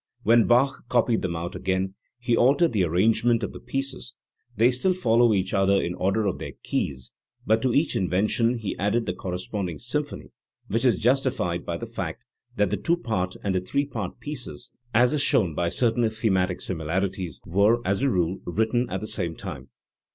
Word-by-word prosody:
When 115 Hz, 0 st, +5 dB
Bach 125 Hz, +3 st, +3 dB
copied 120 Hz, -2 st, +2 dB
them 85 Hz, -2 st, -2 dB
out 85 Hz, +3 st, -5 dB
again 95 Hz, +1 st, -1 dB, 0.2 s
he 120 Hz, -1 st, 0 dB
altered 140 Hz, +6 st, +4 dB
the 100 Hz, -4 st, +2 dB
arrangement 110 Hz, +7 st, +2 dB
of -, -, -3 dB
the -, -, -8 dB
pieces; 135 Hz, -3 st, -4 dB, 0.4 s
they 120 Hz, +3 st, +5 dB
still 130 Hz, +10 st, +1 dB
follow 120 Hz, -7 st, +3 dB
each 95 Hz, -1 st, 0 dB
other 95 Hz, 0 st, +3 dB
in 85 Hz, -, -2 dB
the -, -, -6 dB
order 100 Hz, +4 st, +1 dB
of 95 Hz, -, -1 dB
their -, -, -6 dB
keys, 65 Hz, -3 st, -2 dB, 0.3 s
but 110 Hz, +1 st, +3 dB
to 130 Hz, -, +1 dB
each 145 Hz, +5 st, +1 dB
invention 110 Hz, +6 st, +1 dB
he 110 Hz, -3 st, -4 dB
added 105 Hz, +4 st, +1 dB
the -, -, -2 dB
corresponding 90 Hz, -1 st, -4 dB
symphony, 65 Hz, -, -4 dB, 0.4 s
which 115 Hz, +4 st, 0 dB
is 120 Hz, -7 st, +4 dB
justified 120 Hz, -8 st, 0 dB
by 85 Hz, -, -2 dB
the -, -, -6 dB
fact -, -, -5 dB, 0.3 s
that 105 Hz, -2 st, +1 dB
the -, -, 0 dB
two 170 Hz, +1 st, +1 dB
part 100 Hz, -, -2 dB
and 100 Hz, -, 0 dB
the 95 Hz, -, +1 dB
three 140 Hz, +10 st, -1 dB
part 110 Hz, -9 st, -5 dB
pieces, 135 Hz, -4 st, -6 dB, 0.2 s
as 120 Hz, +3 st, +4 dB
is 150 Hz, -, +1 dB
shown 95 Hz, -, +3 dB
by 85 Hz, +2 st, 0 dB
certain 115 Hz, +3 st, +1 dB
thematic 95 Hz, -5 st, 0 dB
similarities, 90 Hz, +2 st, -2 dB
were, 100 Hz, +6 st, +3 dB
as 100 Hz, +4 st, 0 dB
a 140 Hz, -, +3 dB
rule, 90 Hz, -3 st, 0 dB
written 110 Hz, +7 st, 0 dB
at 95 Hz, +1 st, -3 dB
the -, -, -4 dB
same 85 Hz, -6 st, -2 dB
time. 65 Hz, -1 st, -8 dB
105 Hz, 190 wpm, -25 LUFS, 90-120 Hz, 0.4 s, When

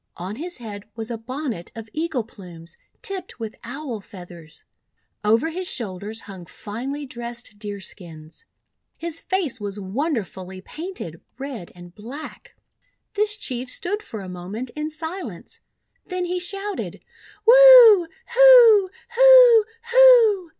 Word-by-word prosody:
On 185 Hz, +5 st, -7 dB
his 345 Hz, +4 st, -6 dB
head 210 Hz, -4 st, -9 dB
was 225 Hz, +1 st, -6 dB
a 230 Hz, -, -4 dB
bon 260 Hz, +5 st, -5 dB
net 170 Hz, -5 st, -8 dB
of 225 Hz, -1 st, -9 dB
eagle 310 Hz, -6 st, -2 dB
plumes 170 Hz, -6 st, -12 dB, 0.3 s
tipped 375 Hz, -8 st, -4 dB
with 220 Hz, -2 st, -6 dB
Owl 250 Hz, -1 st, -6 dB
Feathers. 175 Hz, -6 st, -13 dB, 0.6 s
Over 225 Hz, +9 st, +2 dB
his 365 Hz, +2 st, -5 dB
shoulders 210 Hz, 0 st, -5 dB
hung 190 Hz, -4 st, -12 dB
finely 265 Hz, +8 st, -7 dB
dressed 235 Hz, -3 st, -7 dB
deer 205 Hz, -2 st, -6 dB
skins. 165 Hz, -, -9 dB, 0.5 s
His 330 Hz, -1 st, -4 dB
face 360 Hz, -, -2 dB
was 205 Hz, 0 st, -4 dB
wonderfully 195 Hz, -, -4 dB
painted, 305 Hz, -, -8 dB, 0.2 s
red 260 Hz, -9 st, -8 dB
and 175 Hz, 0 st, -14 dB
black. 250 Hz, +10 st, -11 dB, 0.6 s
This 420 Hz, 0 st, 0 dB
Chief 255 Hz, -, -4 dB
stood 400 Hz, +10 st, -2 dB
for 215 Hz, -, -8 dB
a 190 Hz, -, -9 dB
moment 190 Hz, +7 st, -7 dB
in 300 Hz, 0 st, -4 dB
silence, 320 Hz, +4 st, -8 dB, 0.5 s
then 365 Hz, -1 st, -3 dB
he 360 Hz, +1 st, -3 dB
shouted: 395 Hz, +2 st, -4 dB, 0.2 s
— 420 Hz, -, -24 dB
"Wu! 480 Hz, -6 st, +8 dB, 0.3 s
Hu! 475 Hz, -5 st, +7 dB, 0.2 s
Hu! -, -, +7 dB, 0.3 s
Hu!" 470 Hz, -7 st, +6 dB
255 Hz, 135 wpm, -22 LUFS, -, 0.6 s, Wu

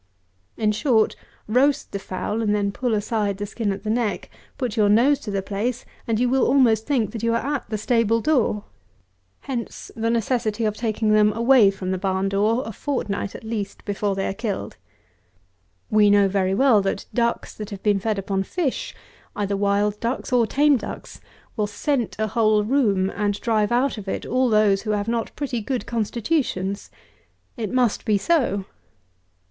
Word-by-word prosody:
In 215 Hz, -1 st, +2 dB
short, 220 Hz, 0 st, +2 dB, 0.3 s
roast 270 Hz, +6 st, +2 dB
the 200 Hz, -, -3 dB
fowl, 200 Hz, +4 st, -3 dB
and 210 Hz, -2 st, +1 dB
then 200 Hz, -1 st, 0 dB
pull 240 Hz, +1 st, -1 dB
aside 210 Hz, -1 st, -1 dB
the 205 Hz, -, -3 dB
skin 215 Hz, 0 st, -2 dB
at 195 Hz, 0 st, -5 dB
the 215 Hz, -, -3 dB
neck, 225 Hz, -3 st, -1 dB, 0.3 s
put 250 Hz, -5 st, -2 dB
your 210 Hz, -3 st, +3 dB
nose 255 Hz, +7 st, +4 dB
to 230 Hz, -, -8 dB
the 195 Hz, -1 st, -2 dB
place, 220 Hz, +6 st, -3 dB, 0.2 s
and 225 Hz, -1 st, 0 dB
you 250 Hz, -, +2 dB
will 265 Hz, +1 st, +2 dB
almost 235 Hz, -5 st, +3 dB
think 250 Hz, -8 st, +1 dB
that 230 Hz, -, -6 dB
you 230 Hz, 0 st, +1 dB
are 280 Hz, +5 st, -1 dB
at 270 Hz, -, -6 dB
the 215 Hz, -, -2 dB
stable 230 Hz, +1 st, +2 dB
door. 240 Hz, -7 st, +1 dB, 0.8 s
Hence 245 Hz, -4 st, -6 dB
the 225 Hz, 0 st, -1 dB
necessity 230 Hz, -1 st, 0 dB
of 215 Hz, -1 st, 0 dB
taking 220 Hz, -1 st, 0 dB
them 210 Hz, 0 st, +5 dB
away 235 Hz, -1 st, +5 dB
from 190 Hz, -1 st, -4 dB
the 185 Hz, -, -1 dB
barn 190 Hz, 0 st, 0 dB
door 215 Hz, +5 st, +1 dB
a 225 Hz, -, -5 dB
fortnight, 210 Hz, -5 st, -3 dB
at -, -, -9 dB
least, 220 Hz, -3 st, -5 dB
before 205 Hz, -1 st, -1 dB
they 195 Hz, -, -1 dB
are -, -, -2 dB
killed. 210 Hz, -1 st, -4 dB, 1.2 s
We 210 Hz, -1 st, +5 dB
know 205 Hz, -1 st, +5 dB
very 190 Hz, -1 st, 0 dB
well 240 Hz, -3 st, +5 dB
that 195 Hz, 0 st, -2 dB
ducks 235 Hz, -1 st, -1 dB
that 210 Hz, -1 st, -7 dB
have 200 Hz, -3 st, -8 dB
been 205 Hz, -2 st, +3 dB
fed 215 Hz, +1 st, -1 dB
upon 195 Hz, 0 st, -1 dB
fish, 280 Hz, -, -3 dB, 0.4 s
either 200 Hz, -1 st, -1 dB
wild 205 Hz, +1 st, +1 dB
ducks, 250 Hz, +2 st, -3 dB
or 235 Hz, -2 st, +4 dB
tame 290 Hz, +3 st, +4 dB
ducks, -, -, -8 dB, 0.3 s
will 210 Hz, -3 st, 0 dB
scent 240 Hz, +3 st, -1 dB
a 220 Hz, -, 0 dB
whole 215 Hz, -1 st, +2 dB
room, 205 Hz, -6 st, +1 dB
and 205 Hz, 0 st, -1 dB
drive 215 Hz, -2 st, +1 dB
out 245 Hz, -1 st, +1 dB
of 200 Hz, -, -10 dB
it -, -, -3 dB
all 255 Hz, +1 st, +1 dB
those 210 Hz, -3 st, +3 dB
who 215 Hz, -1 st, -2 dB
have 205 Hz, 0 st, -1 dB
not 230 Hz, -1 st, -1 dB
pretty 260 Hz, -5 st, -3 dB
good 250 Hz, +3 st, -3 dB
constitutions. 220 Hz, -, -2 dB, 0.7 s
It 220 Hz, -5 st, -4 dB
must 250 Hz, -4 st, +1 dB
be 210 Hz, -2 st, +2 dB
so. 200 Hz, -, +1 dB
215 Hz, 185 wpm, -23 LUFS, 205-240 Hz, 1.2 s, them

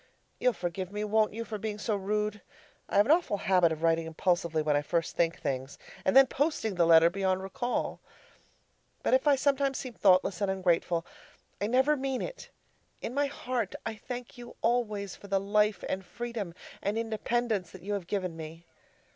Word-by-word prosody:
You'll 250 Hz, -, +3 dB
forgive 180 Hz, 0 st, -4 dB
me, 210 Hz, +1 st, -3 dB
won't 215 Hz, 0 st, +2 dB
you, 230 Hz, +1 st, -4 dB
for 215 Hz, -2 st, -5 dB
being 210 Hz, 0 st, -3 dB
so 210 Hz, 0 st, -1 dB
rude? 210 Hz, +1 st, -1 dB, 0.5 s
I -, -, 0 dB
have 205 Hz, -, +6 dB
an 285 Hz, -, +3 dB
awful 325 Hz, -, +3 dB
habit 180 Hz, -4 st, +3 dB
of 160 Hz, 0 st, -4 dB
writing 165 Hz, 0 st, +2 dB
impulsively 165 Hz, -1 st, 0 dB
when 150 Hz, -1 st, +2 dB
I 145 Hz, -, +3 dB
first 165 Hz, +2 st, -1 dB
think 165 Hz, -1 st, +1 dB
things, 135 Hz, +1 st, -3 dB, 0.3 s
and 190 Hz, -, +4 dB
then 270 Hz, -, +10 dB
posting 265 Hz, -5 st, -1 dB
the 175 Hz, -2 st, +3 dB
letter 165 Hz, 0 st, +7 dB
beyond 190 Hz, 0 st, 0 dB
recall. 245 Hz, +5 st, -2 dB, 1.0 s
But -, -, +1 dB
if 260 Hz, +3 st, +3 dB
I 285 Hz, -, +6 dB
sometimes 275 Hz, 0 st, +1 dB
seem 255 Hz, -3 st, -6 dB
thoughtless 185 Hz, -2 st, +3 dB
and 200 Hz, -, +1 dB
ungrateful, 175 Hz, -3 st, +1 dB, 0.6 s
I 205 Hz, -, +1 dB
never 260 Hz, +6 st, +3 dB
mean 265 Hz, -2 st, -2 dB
it. -, -, -7 dB, 0.5 s
In 235 Hz, -, -3 dB
my 285 Hz, +1 st, +1 dB
heart 250 Hz, -6 st, -3 dB
I 225 Hz, -, -2 dB
thank 245 Hz, +3 st, -8 dB
you 240 Hz, 0 st, -10 dB
always 210 Hz, -5 st, 0 dB
for 200 Hz, -, -13 dB
the 195 Hz, 0 st, +1 dB
life 210 Hz, +1 st, +1 dB
and 190 Hz, 0 st, -2 dB
freedom 225 Hz, -4 st, -5 dB, 0.3 s
and 205 Hz, +2 st, -1 dB
independence 225 Hz, -3 st, -1 dB
that 185 Hz, -2 st, -13 dB
you 205 Hz, +2 st, -3 dB
have 195 Hz, -4 st, -3 dB
given 185 Hz, -4 st, -2 dB
me. 165 Hz, +1 st, -9 dB
205 Hz, 190 wpm, -29 LUFS, 175-240 Hz, 1.0 s, then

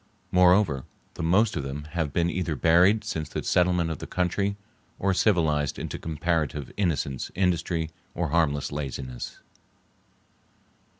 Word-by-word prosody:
Moreover, 90 Hz, -6 st, +4 dB, 0.3 s
the -, -, -7 dB
most 95 Hz, +7 st, +3 dB
of 75 Hz, -, -1 dB
them 70 Hz, +2 st, -5 dB
have 80 Hz, -4 st, -1 dB
been 85 Hz, +2 st, +1 dB
either 85 Hz, -2 st, -1 dB
buried 90 Hz, +8 st, +4 dB
since 80 Hz, -2 st, -4 dB
the -, -, -4 dB
settlement 90 Hz, -2 st, +2 dB
of 80 Hz, -, -5 dB
the -, -, -7 dB
country 100 Hz, +3 st, 0 dB, 0.4 s
or 95 Hz, 0 st, +1 dB
civilized 80 Hz, -8 st, +2 dB
into -, -, -5 dB
comparative 80 Hz, -3 st, -2 dB
innocence, 75 Hz, -9 st, -1 dB
industry, 85 Hz, -3 st, 0 dB, 0.2 s
or 85 Hz, -2 st, -1 dB
harmless 75 Hz, -3 st, +1 dB
laziness. 65 Hz, -4 st, -5 dB
85 Hz, 130 wpm, -26 LUFS, 75-90 Hz, 0.4 s, Moreover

